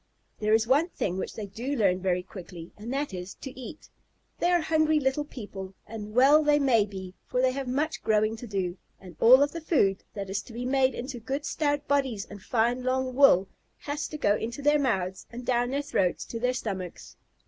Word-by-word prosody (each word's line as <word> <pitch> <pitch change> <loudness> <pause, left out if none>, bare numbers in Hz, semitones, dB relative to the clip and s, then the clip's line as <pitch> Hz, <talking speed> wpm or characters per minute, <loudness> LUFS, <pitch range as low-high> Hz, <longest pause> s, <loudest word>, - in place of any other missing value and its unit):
There 215 0 +3
is 220 0 +2
one 285 +8 +3
thing 190 - -2
which - - -5
they 215 - -5
do 235 +8 -4
learn 190 -6 +2
very 180 -1 0
quickly, 180 -3 -10
and 220 +3 -7
that 280 -4 -2
is, 180 +1 -6
to 265 - -8
eat. 260 +4 -10 0.5
They 350 - +2
are 350 -1 +3
hungry 315 -1 +2
little 270 +1 0
people, 195 -8 -8
and 215 -1 -8
well 285 +5 +6
they 295 0 +4
may 255 -7 +3
be, 190 -3 -8
for 250 - -1
they 255 0 +3
have 270 0 -4
much 290 +5 -1
growing 215 0 +2
to 240 - -8
do, 190 -3 -2 0.2
and 180 -3 -12
all 255 +4 +8
of 285 - -1
the 335 - -6
food 205 - +2
that 200 -1 -4
is 195 +2 -2
to 235 - -13
be 245 +2 -4
made 260 -1 +2
into 250 0 -5
good 270 +6 -4
stout 290 -1 -1
bodies 265 -8 0
and 205 -1 -11
fine 240 +4 +1
long 255 0 -1
wool 250 -9 +6 0.3
has 290 0 -4
to 305 - -6
go 205 -8 +3
into 235 +6 -5
their 295 +1 +4
mouths 190 -8 -1
and 240 +1 -8
down 245 -1 +1
their 280 +2 -1
throats 190 -10 0
to 230 - -6
their 250 +2 +1
stomachs. 190 -7 -5
245 Hz, 215 wpm, -27 LUFS, 200-280 Hz, 0.5 s, all